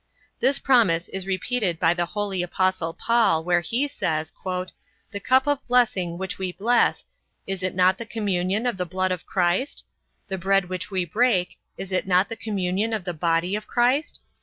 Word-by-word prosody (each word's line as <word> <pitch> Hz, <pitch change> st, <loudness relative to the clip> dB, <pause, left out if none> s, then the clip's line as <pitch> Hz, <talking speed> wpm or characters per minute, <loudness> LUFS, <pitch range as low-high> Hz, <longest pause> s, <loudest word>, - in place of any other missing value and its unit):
This 275 Hz, +1 st, +3 dB
promise 210 Hz, -13 st, +3 dB
is 190 Hz, 0 st, -5 dB
repeated 190 Hz, -2 st, -1 dB
by 165 Hz, -, +4 dB
the 175 Hz, -1 st, -1 dB
holy 200 Hz, -1 st, -2 dB
apostle 185 Hz, -1 st, 0 dB
Paul, 225 Hz, -5 st, +2 dB
where 175 Hz, 0 st, +2 dB
he 235 Hz, -, -1 dB
says 160 Hz, -, -2 dB, 0.8 s
"The 200 Hz, -, -5 dB
cup 260 Hz, +5 st, +3 dB
of 290 Hz, -1 st, -1 dB
blessing 200 Hz, -9 st, +2 dB
which 190 Hz, +1 st, -5 dB
we 185 Hz, -1 st, -2 dB
bless, 235 Hz, +7 st, +2 dB, 0.4 s
is 195 Hz, -1 st, -4 dB
it 185 Hz, 0 st, -2 dB
not 185 Hz, +1 st, +3 dB
the 235 Hz, -, -5 dB
communion 200 Hz, -1 st, -1 dB
of 245 Hz, -5 st, 0 dB
the 180 Hz, -, -1 dB
blood 185 Hz, +2 st, -1 dB
of 180 Hz, -2 st, -4 dB
Christ? 180 Hz, +9 st, 0 dB, 0.4 s
The 190 Hz, -1 st, -4 dB
bread 195 Hz, 0 st, +2 dB
which 185 Hz, +2 st, -4 dB
we 185 Hz, -3 st, -1 dB
break, 205 Hz, -1 st, +1 dB, 0.2 s
is 195 Hz, -, -7 dB
it 185 Hz, 0 st, -1 dB
not 185 Hz, +1 st, +3 dB
the 230 Hz, -, -4 dB
communion 205 Hz, 0 st, -1 dB
of 215 Hz, -4 st, -2 dB
the 175 Hz, -, -3 dB
body 170 Hz, +3 st, 0 dB
of 210 Hz, 0 st, -5 dB
Christ? 255 Hz, +5 st, +1 dB
190 Hz, 185 wpm, -24 LUFS, 180-225 Hz, 0.8 s, by